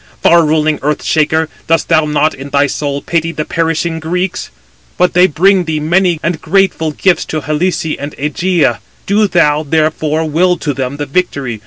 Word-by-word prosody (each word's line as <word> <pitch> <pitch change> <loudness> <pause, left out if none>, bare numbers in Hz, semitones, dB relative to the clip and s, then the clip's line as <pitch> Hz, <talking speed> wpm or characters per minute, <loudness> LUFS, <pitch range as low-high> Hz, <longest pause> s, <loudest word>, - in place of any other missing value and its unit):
far 170 0 +4
ruling 155 0 +1
Earth 150 +1 -1
shaker, 160 +1 +1 0.2
dost 165 0 +1
thou 160 -2 +3
not 150 +1 +1
in 135 +1 -9
thy 140 0 +2
soul 140 0 -3
pity 165 -1 -1
the 155 -1 -4
perishing 165 0 -1
Greeks? 180 +3 -3 0.5
But 180 0 +2
they 180 +1 +5
bring 185 +3 +2
thee 160 -1 -2
many 175 +2 +1
and 165 -2 -2
grateful 190 -2 +1
gifts 175 +4 +1
to 155 - -4
Helice 155 +5 -1
and 145 +1 -7
Ægæ. 150 - 0 0.3
Do 210 +1 +2
thou, 150 -5 +2
therefore, 155 +1 0
will 175 +4 +2
to 145 - -3
them 130 +1 -4
the 145 - -3
victory. 140 -7 -2
160 Hz, 175 wpm, -13 LUFS, 150-175 Hz, 0.5 s, they